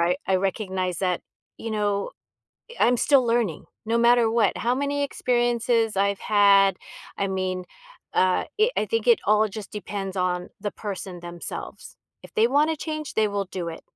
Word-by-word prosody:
I 175 Hz, +2 st, +2 dB
I 190 Hz, -, +3 dB
recognize 185 Hz, -2 st, -2 dB
that, 180 Hz, -2 st, -1 dB, 0.3 s
you 225 Hz, -, -6 dB
know, 205 Hz, -2 st, -1 dB, 0.6 s
eh, -, -, -10 dB
I'm 245 Hz, +1 st, +4 dB
still 270 Hz, +1 st, +4 dB
learning 230 Hz, -8 st, 0 dB, 0.2 s
no 230 Hz, +1 st, +1 dB
matter 235 Hz, -1 st, +4 dB
what. 225 Hz, -4 st, +2 dB
How 245 Hz, +2 st, 0 dB
many 285 Hz, +1 st, -1 dB
experiences 240 Hz, -4 st, +1 dB
I've 200 Hz, 0 st, +1 dB
had, 200 Hz, -2 st, +5 dB, 0.4 s
I 200 Hz, -, 0 dB
mean, 185 Hz, -1 st, -2 dB, 0.5 s
uh, 185 Hz, 0 st, +3 dB
it 445 Hz, +4 st, +3 dB
I -, -, +1 dB
think 455 Hz, +1 st, -1 dB
it 475 Hz, -2 st, +5 dB
all 215 Hz, +1 st, +4 dB
just 210 Hz, 0 st, -8 dB
depends 200 Hz, -2 st, -5 dB
on 180 Hz, -1 st, -1 dB
the 205 Hz, -, -2 dB
person, 190 Hz, -4 st, -6 dB
themselves. 175 Hz, 0 st, -8 dB, 0.3 s
If -, -, -14 dB
they 220 Hz, -, +4 dB
wanna 300 Hz, +4 st, +2 dB
change, 310 Hz, -1 st, -5 dB
they 215 Hz, -1 st, +2 dB
will 200 Hz, -1 st, -2 dB
do 180 Hz, -2 st, -5 dB
it. 165 Hz, -, -8 dB
210 Hz, 170 wpm, -24 LUFS, 190-240 Hz, 0.6 s, had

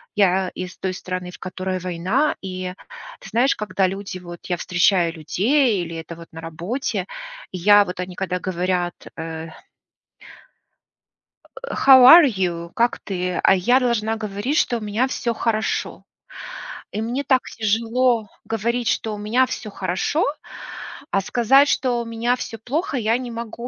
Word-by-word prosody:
я 190 Hz, -2 st, +3 dB
из 180 Hz, 0 st, -6 dB
той 190 Hz, -1 st, -3 dB
страны, 180 Hz, -1 st, -5 dB
в -, -, -13 dB
которой 185 Hz, 0 st, -4 dB
война, 185 Hz, -, 0 dB
и 185 Hz, -1 st, -5 dB, 0.5 s
ты -, -, -11 dB
знаешь, 250 Hz, +4 st, +2 dB
когда 195 Hz, -2 st, 0 dB
люди, 195 Hz, 0 st, -5 dB
вот 175 Hz, -1 st, -11 dB
я 175 Hz, -, -1 dB
встречаю 175 Hz, -1 st, +2 dB
людей 205 Hz, -, +1 dB
или 165 Hz, 0 st, -7 dB
это 165 Hz, +1 st, -7 dB
вот 170 Hz, 0 st, -12 dB
на 165 Hz, -, -9 dB
работе, 185 Hz, -, -3 dB, 0.5 s
я 205 Hz, +3 st, +5 dB
вот, 180 Hz, 0 st, -7 dB
они, 180 Hz, 0 st, -5 dB
когда 180 Hz, -1 st, -2 dB
говорят: 180 Hz, -1 st, -1 dB, 0.2 s
"Э" 160 Hz, 0 st, -6 dB, 1.9 s
"э, -, -, -9 dB
How 265 Hz, -1 st, +7 dB
are 330 Hz, +5 st, +10 dB
you? 175 Hz, -6 st, -2 dB
Как 235 Hz, +1 st, +1 dB
ты?" 180 Hz, -3 st, -3 dB
А -, -, +5 dB
я 245 Hz, +8 st, +3 dB
должна 225 Hz, -3 st, 0 dB
говорить, 215 Hz, +7 st, -2 dB
что 240 Hz, -7 st, +2 dB
у -, -, -13 dB
меня 215 Hz, +5 st, 0 dB
всё 235 Hz, -2 st, -2 dB
хорошо. 220 Hz, -1 st, -2 dB, 0.9 s
И 215 Hz, -, -3 dB
мне 240 Hz, +5 st, -2 dB
так 260 Hz, -2 st, +2 dB
тяжело 230 Hz, +1 st, +1 dB, 0.2 s
говорить, 235 Hz, +2 st, -1 dB
что 220 Hz, -1 st, -1 dB
у -, -, -8 dB
меня 220 Hz, +5 st, +2 dB
всё 220 Hz, -4 st, -6 dB
хорошо. 190 Hz, -, -1 dB, 0.9 s
А 195 Hz, -, +2 dB
сказать, 265 Hz, +7 st, +4 dB
что 245 Hz, -2 st, +1 dB
у -, -, -6 dB
меня 230 Hz, +2 st, 0 dB
всё 230 Hz, -2 st, -7 dB
плохо, 285 Hz, -, -2 dB
я 225 Hz, 0 st, +1 dB
не 250 Hz, -1 st, -6 dB
могу. 235 Hz, +1 st, -6 dB
205 Hz, 155 wpm, -22 LUFS, 180-240 Hz, 1.9 s, are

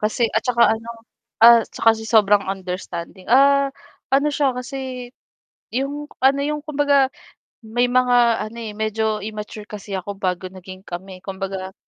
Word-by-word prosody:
Kasi 220 Hz, +2 st, +1 dB
at 220 Hz, -, +2 dB
'tsaka 240 Hz, -2 st, +2 dB, 0.2 s
ano, 230 Hz, -, -13 dB, 0.5 s
ah, 235 Hz, 0 st, +9 dB
siya -, -, -11 dB
kasi 220 Hz, -, -6 dB
sobrang 210 Hz, -3 st, +4 dB
understanding 185 Hz, -1 st, -6 dB
ah, 275 Hz, +2 st, +5 dB, 0.4 s
ano 280 Hz, +2 st, +3 dB
siya 280 Hz, -3 st, +1 dB
kasi, 255 Hz, -1 st, -6 dB, 0.6 s
yung 280 Hz, +4 st, -3 dB
ano, 270 Hz, +1 st, +4 dB
yung 300 Hz, +1 st, -2 dB
kumbaga, 285 Hz, -2 st, +2 dB, 0.6 s
may 240 Hz, +3 st, +1 dB
mga 250 Hz, 0 st, +3 dB, 0.3 s
ano 230 Hz, -, -13 dB
eh, 220 Hz, -2 st, -6 dB
medyo 220 Hz, 0 st, -1 dB, 0.2 s
immature 210 Hz, 0 st, -7 dB
kasi 205 Hz, -1 st, -8 dB
ako 195 Hz, +2 st, -6 dB
bago 185 Hz, -1 st, -2 dB
naging 185 Hz, 0 st, -11 dB
kami, 185 Hz, +2 st, -8 dB
kumbaga, 190 Hz, -1 st, -5 dB
225 Hz, 145 wpm, -21 LUFS, 195-265 Hz, 0.6 s, ah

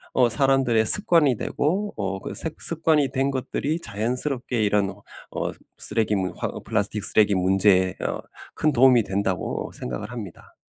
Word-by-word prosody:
어 125 Hz, -2 st, +4 dB
사람들의 125 Hz, -1 st, +2 dB
습관이 165 Hz, -, +5 dB
되고 190 Hz, -, -2 dB
어 95 Hz, -1 st, -3 dB
그 -, -, -7 dB
색 160 Hz, -1 st, -4 dB
습관이 155 Hz, -4 st, +1 dB
된 135 Hz, 0 st, 0 dB
것들이 140 Hz, +4 st, -3 dB
자연스럽게 125 Hz, +1 st, -2 dB
이런 100 Hz, -1 st, +1 dB
어 -, -, -7 dB, 0.3 s
쓰레기 110 Hz, -2 st, 0 dB
문 95 Hz, -2 st, -2 dB
화 -, -, -3 dB
어 -, -, -8 dB
'플라스틱 105 Hz, -1 st, -2 dB
쓰레기 105 Hz, -1 st, +4 dB
문제에 95 Hz, 0 st, +3 dB
어 -, -, -3 dB, 0.3 s
큰 155 Hz, -, +1 dB
도움이 125 Hz, -2 st, +5 dB
된다.'고 95 Hz, -1 st, -3 dB
생각을 60 Hz, +12 st, -6 dB
합니다. 105 Hz, -8 st, -10 dB
115 Hz, 325 characters per minute, -23 LUFS, 100-135 Hz, 0.3 s, 습관이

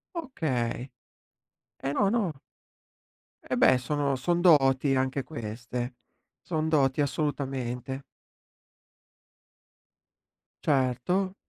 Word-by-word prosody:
Okay, 135 Hz, -, -2 dB, 0.9 s
eh 135 Hz, -, -1 dB
no, 200 Hz, +6 st, +2 dB
no. 195 Hz, -, -1 dB, 1.0 s
E -, -, -2 dB
beh, 130 Hz, -, +6 dB
sono 140 Hz, +2 st, 0 dB
son 170 Hz, +7 st, 0 dB
doti 135 Hz, -5 st, +5 dB
anche 130 Hz, +1 st, 0 dB
queste. 120 Hz, -1 st, -5 dB, 0.5 s
Son 160 Hz, -2 st, -1 dB
doti, 140 Hz, -2 st, +3 dB
assolutamente. 135 Hz, -3 st, -2 dB, 2.6 s
Certo. 150 Hz, +8 st, +1 dB
135 Hz, 80 wpm, -28 LUFS, 130-155 Hz, 2.6 s, beh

